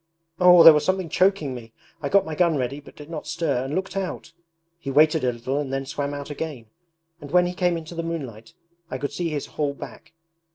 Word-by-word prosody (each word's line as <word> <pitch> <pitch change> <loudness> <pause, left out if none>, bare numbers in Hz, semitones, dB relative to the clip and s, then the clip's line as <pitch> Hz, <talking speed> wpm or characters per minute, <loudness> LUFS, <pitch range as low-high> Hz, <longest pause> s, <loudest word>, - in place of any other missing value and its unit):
Oh, 180 -2 +8
there 165 - +11
was 150 0 +1
something 185 +1 -1
choking 185 -6 +1
me! 115 -2 -10 0.3
I 140 - -2
got 200 +4 +4
my 160 - -5
gun 165 -1 +2
ready 135 +2 -3
but 145 - -16
did 150 - -11
not 160 -2 -7
stir, 140 -7 -1
and 140 +3 -4
looked 190 0 -3
out. 185 -3 -4 0.5
He 145 - -6
waited 155 +2 +4
a 125 - +2
little 125 +4 -3
and 140 -3 -4
then 135 0 -2
swam 140 +1 -3
out 145 +1 -7
again; 145 -5 -6 0.6
and 145 - -9
when 180 +3 +4
he 175 - -3
came 180 -2 0
into 160 +1 -8
the 165 - -3
moonlight 145 -6 -6 0.3
I 130 - -4
could 140 +2 -4
see 170 +2 -2
his 150 -3 -3
whole 145 -2 -3
back. 160 - -11
150 Hz, 230 wpm, -24 LUFS, 140-170 Hz, 0.6 s, there